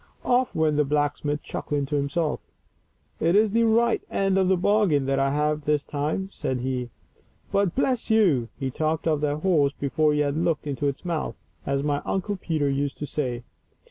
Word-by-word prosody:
Of! 250 +1 +1
went 155 -2 +2
the 150 - +4
blacksmith, 145 0 -1
chuckling 145 -1 -3
to 145 - -3
himself. 145 +2 0 0.4
" - - -42
It 175 - +3
is 215 0 +4
the 230 +2 +3
right 230 +1 +3
end 195 -1 +1
of 190 - +2
the 190 0 +3
bargain 185 -7 +2
that 135 0 +1
I 135 0 +2
have 150 +1 0
this 150 -1 +1
time," 155 +7 -2
said 130 -8 -3
he. 125 -1 -2 0.6
But, 200 -3 +1
bless 255 -3 0
you! 175 - +3
he 135 -1 -3
talked 155 +3 -1
of 155 -2 +1
that 150 0 -1
horse 150 -7 +3
before 150 +2 +1
he 150 - +2
had 145 -1 0
looked 165 -1 0
into 145 0 -2
its 140 +5 -4
mouth, 170 -3 -2 0.3
as 140 0 0
my 145 -1 0
Uncle 195 +2 -2
Peter 155 -5 -1
used 140 0 -1
to 150 - -4
say. 125 -5 -3
150 Hz, 195 wpm, -25 LUFS, 140-185 Hz, 0.6 s, the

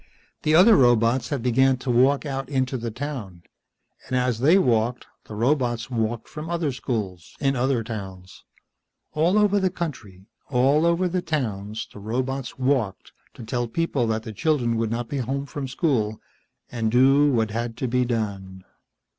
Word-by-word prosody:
The 155 +1 +2
other 200 +6 +7
robots 120 0 +3
had 140 -6 -3
begun 130 +2 +3
to 125 0 -3
walk 135 +5 +3
out 135 -1 -4
into 130 -2 -1
the 120 -2 -3
town, 110 -8 -6 0.6
and 130 - -1
as 125 -2 0
they 155 +9 +5
walked 120 - +1 0.2
the 105 - -9
robots 120 -1 0
walked 115 -1 -2
from 155 +1 -7
other 170 -4 -1
schools, 105 -8 -5
in 135 -1 +1
other 125 -1 +1
towns. 95 -4 -8 0.7
All 165 +6 +2
over 205 -1 +3
the 190 -1 +1
country, 125 - -6 0.2
all 140 +5 +3
over 170 +2 +2
the 180 +1 -1
towns, 110 - -3
the - - -10
robots 130 +5 -3
walked 130 -6 -1 0.2
to - - -9
tell 120 +2 -2
the - - -20
people 145 -8 0
that 110 0 -1
the 110 - -7
children 125 -2 0
would 115 -1 0
not 115 +1 -3
be 140 - -4
home 135 +3 -2
from 140 0 -5
school, 125 -6 0 0.5
and 115 -2 -1
do 135 +4 +5
what 110 -4 +1
had 115 +1 -3
to 130 - -2
be 125 +1 +1
done. 100 -6 -4
125 Hz, 170 wpm, -24 LUFS, 110-140 Hz, 0.7 s, other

